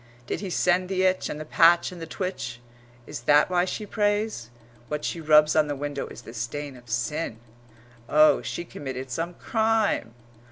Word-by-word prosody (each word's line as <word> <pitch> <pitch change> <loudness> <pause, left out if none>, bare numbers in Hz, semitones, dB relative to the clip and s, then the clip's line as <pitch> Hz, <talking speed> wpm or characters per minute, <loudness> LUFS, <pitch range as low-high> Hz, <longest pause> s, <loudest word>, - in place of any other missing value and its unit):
Did - - -3
he 195 - -4
send 180 +1 +1
the 190 -1 0
itch 185 0 +1
and 150 - -5
the 155 - -6
patch 170 +3 +4
and 175 -2 -10
the 165 - -6
twitch? 140 -11 -4 0.5
Is - - -6
that 150 +4 +5
why 180 0 +3
she 210 +3 -4
prays? 205 - -1 0.4
What 150 0 -3
she 170 - -3
rubs 150 0 +5
on 155 -1 +4
the 145 - -2
window 145 0 -4
is 120 - -11
the 115 - -10
stain 135 +4 -5
of 120 -2 -16
sin. 120 +3 -2 0.7
Oh, 155 +1 +5
she 170 - -5
committed 130 -4 -7
some 165 +6 -3
crime! 220 - 0
155 Hz, 185 wpm, -26 LUFS, 135-185 Hz, 0.7 s, that